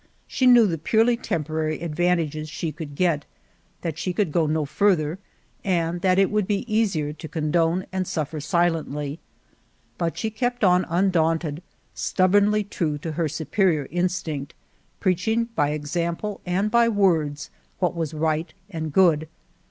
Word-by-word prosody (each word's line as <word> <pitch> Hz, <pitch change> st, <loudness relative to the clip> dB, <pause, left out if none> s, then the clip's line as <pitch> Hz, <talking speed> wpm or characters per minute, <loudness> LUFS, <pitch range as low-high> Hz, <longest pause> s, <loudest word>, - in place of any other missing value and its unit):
She 255 Hz, -, +1 dB
knew 240 Hz, -2 st, +8 dB
the 165 Hz, -5 st, -1 dB
purely 225 Hz, +8 st, +3 dB
temporary 155 Hz, -, -2 dB
advantages 160 Hz, -2 st, 0 dB
she 165 Hz, 0 st, -3 dB
could 150 Hz, -1 st, -8 dB
get, 165 Hz, -3 st, +1 dB, 0.6 s
that 165 Hz, -2 st, -4 dB
she 180 Hz, -, -2 dB
could 185 Hz, -3 st, 0 dB
go 160 Hz, 0 st, +2 dB
no 155 Hz, 0 st, 0 dB
farther, 170 Hz, 0 st, +1 dB, 0.4 s
and 175 Hz, -2 st, 0 dB
that 185 Hz, 0 st, +3 dB
it 195 Hz, -1 st, +3 dB
would 210 Hz, -2 st, +1 dB
be 205 Hz, +2 st, -1 dB
easier 195 Hz, -10 st, 0 dB
to 160 Hz, +1 st, -9 dB
condone 165 Hz, +3 st, 0 dB
and 185 Hz, -1 st, -2 dB
suffer 155 Hz, -1 st, -3 dB
si 150 Hz, +4 st, -2 dB
lently. 155 Hz, -3 st, 0 dB, 0.8 s
But 165 Hz, -1 st, -1 dB
she 220 Hz, -, -2 dB
kept 245 Hz, +2 st, -2 dB
on 180 Hz, -1 st, +4 dB
undaunted, 165 Hz, -3 st, +1 dB, 0.3 s
stub 185 Hz, 0 st, +1 dB
bornly 205 Hz, 0 st, +3 dB
true 155 Hz, -7 st, -1 dB
to 160 Hz, +2 st, -5 dB
her 155 Hz, 0 st, -1 dB
superior 160 Hz, -1 st, 0 dB
instinct, 175 Hz, -5 st, -2 dB, 0.4 s
preaching 220 Hz, +5 st, +1 dB
by 145 Hz, -8 st, +1 dB
example 170 Hz, +7 st, -3 dB
and 195 Hz, +4 st, 0 dB
by 235 Hz, 0 st, +4 dB
words 165 Hz, -9 st, +1 dB, 0.3 s
what 180 Hz, -1 st, 0 dB
was 160 Hz, -2 st, -3 dB
right 160 Hz, +1 st, 0 dB, 0.2 s
and 160 Hz, -3 st, -4 dB
good. 160 Hz, -2 st, +4 dB
170 Hz, 150 wpm, -24 LUFS, 155-190 Hz, 0.8 s, knew